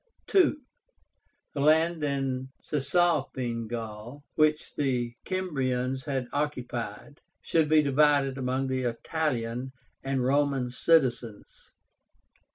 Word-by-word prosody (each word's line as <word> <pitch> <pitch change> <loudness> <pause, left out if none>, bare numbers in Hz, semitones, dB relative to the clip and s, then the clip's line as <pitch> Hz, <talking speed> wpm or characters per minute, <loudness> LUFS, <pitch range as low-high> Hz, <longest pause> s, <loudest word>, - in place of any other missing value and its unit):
II. 375 -5 +6 1.0
The 145 - -4
land 160 +2 +3
in 135 -2 -1
Cisalpine 140 -6 0
Gaul, 115 +4 -7
which 155 0 +1
the 125 -4 0
Cimbrians 130 -8 -1
had 135 -3 -1
occupied, 125 -4 -4 0.2
should 160 -2 +1
be 155 -1 +5
divided 140 -1 +3
among 130 +1 -1
the 130 -1 -1
Italian 125 -1 -2 0.3
and 135 -1 -1
Roman 135 -1 +1
citizens. 125 -7 0
135 Hz, 95 wpm, -28 LUFS, 125-150 Hz, 1.0 s, II